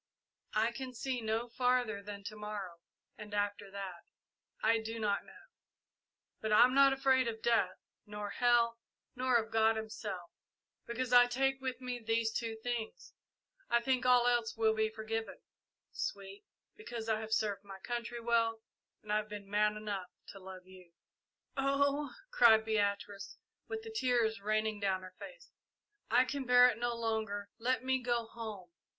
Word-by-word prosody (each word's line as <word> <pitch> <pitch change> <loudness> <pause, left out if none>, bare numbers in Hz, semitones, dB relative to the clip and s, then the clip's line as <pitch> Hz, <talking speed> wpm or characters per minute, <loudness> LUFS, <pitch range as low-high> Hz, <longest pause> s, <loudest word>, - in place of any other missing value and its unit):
I 220 +2 +3
can 255 +1 -7
see 255 +1 -2
no 225 +2 -1
farther 245 -3 +1
than 200 0 -8
to 215 +1 -6
morrow, 205 -5 -6 0.4
and 210 0 -7
after 205 -1 -1
that 195 -3 -7 0.6
I 225 +1 +4
do 225 +1 -5
not 205 -2 0
know. - - -16 1.0
But 220 - -2
I'm 245 +4 +7
not 275 0 +7
afraid 265 -2 +3
of 220 -1 -5
death, 225 -6 +2 0.3
nor 210 -1 -5
hell, 235 0 +3 0.4
nor 255 0 +1
of 225 -1 +2
God 225 0 +4
Himself, 210 -5 -5 0.6
because 250 +1 -2
I 245 0 +8
take 270 +2 0
with 260 -2 -3
me 250 -1 -4
these 225 0 0
two 230 -1 -2
things. 240 -3 -4 0.6
I 235 - +4
think 255 +1 0
all 250 -1 +5
else 240 -2 +1
will 220 -1 +3
be 220 0 +1
forgiven, 220 +1 -4 0.5
Sweet, 200 0 -5 0.3
because 240 - -7
I 220 -1 +1
have 220 0 -7
served 205 -3 0
my 195 -1 -9
country 240 0 -4
well 230 -1 +1 0.4
and 210 - -3
I - - +4
have 215 0 -3
been 205 -1 -7
man 210 +1 +2
enough 205 -4 -4 0.2
to 195 - -10
love 185 -1 -10
you." 185 -2 -16 0.6
"Oh," 280 0 +1 0.2
cried 220 -2 +6
Beatrice, 200 -2 -1 0.3
with 440 0 -5
the 450 -1 -8
tears 235 - +1
raining 215 +1 0
down 190 -2 0
her 185 0 -10
face, - - -11 0.6
"I 245 +3 +5
can 270 +1 -3
bear 250 0 +7
it 245 - -3
no 240 0 -1
longer 220 -3 -2
let 255 +3 0
me 260 0 +1
go 240 -2 0
home!" 215 -6 -8
225 Hz, 165 wpm, -33 LUFS, 210-245 Hz, 1.0 s, I